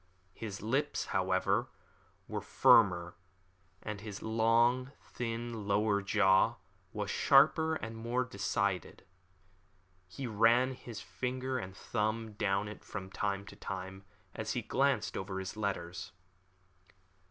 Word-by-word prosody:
His 100 -2 -6
lips, 135 +7 0
however, 95 0 +1 0.6
were - - -3
firmer, 90 -5 +4 0.7
and 105 -2 -5
his 105 -2 -7
long, 115 +3 +3
thin, 115 -2 -5
lower 100 0 +2
jaw 95 -1 +4 0.4
was - - -3
sharper 160 0 +5
and 115 -6 -5
more 120 +3 -1
decided. 100 -4 -2 1.0
He 130 +9 -6
ran 120 +3 +4
his 115 -4 -8
finger 130 +1 -3
and 95 -3 -7
thumb 110 0 -2
down 100 0 0
it 105 - -9
from 95 -3 -7
time 100 0 -2
to - - -11
time, 95 0 -6 0.3
as - - -3
he - - -2
glanced - - +1
over 95 0 -4
his 95 +1 -5
letters. 90 -5 -3
105 Hz, 120 wpm, -33 LUFS, 95-115 Hz, 1.0 s, sharper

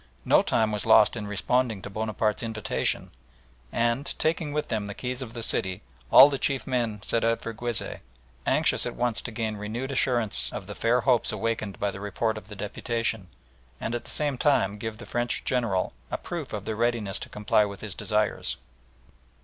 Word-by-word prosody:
No - - +6
time 110 -1 +1
was 105 +1 -3
lost 110 0 +6
in 105 -3 -4
responding 110 0 0
to - - -6
Bonaparte's 110 0 -1
invitation, 110 -2 -1 0.6
and, 120 +4 0
taking 160 -1 0
with 150 +1 -1
them 105 -2 -1
the 100 - -6
keys 125 +1 -4
of 120 -2 -7
the 115 - -2
city, 95 -3 0 0.3
all 135 - +11
the 140 -2 -2
chief 135 -2 0
men 115 -6 -1
set 115 - +1
out 115 0 +2
for 115 - -5
Guizeh, 120 0 -1 0.5
anxious - - +3
at - - -5
once 120 -2 0
to 120 - -6
gain 110 -2 -2
renewed 115 +6 -4
assurance 120 -5 +2
of - - -6
the - - -7
fair 120 +2 +2
hopes 125 -4 +3
awakened 110 -3 -2
by 100 0 0
the 100 - -8
report 105 +3 -1
of 110 -1 -9
the 105 - -9
deputation, 110 0 -2 0.5
and 115 - -3
at 120 - -3
the - - -11
same 145 -4 -1
time 105 -9 +2
give 110 0 -4
the 120 - -10
French 120 0 -2
General 115 -7 0 0.2
a - - -2
proof - - -6
of - - -5
their 110 - -2
readiness 115 -3 0
to - - -7
comply 105 0 +2
with 100 -1 -5
his 105 -4 -5
desires. 105 - 0
115 Hz, 195 wpm, -27 LUFS, 105-120 Hz, 0.6 s, all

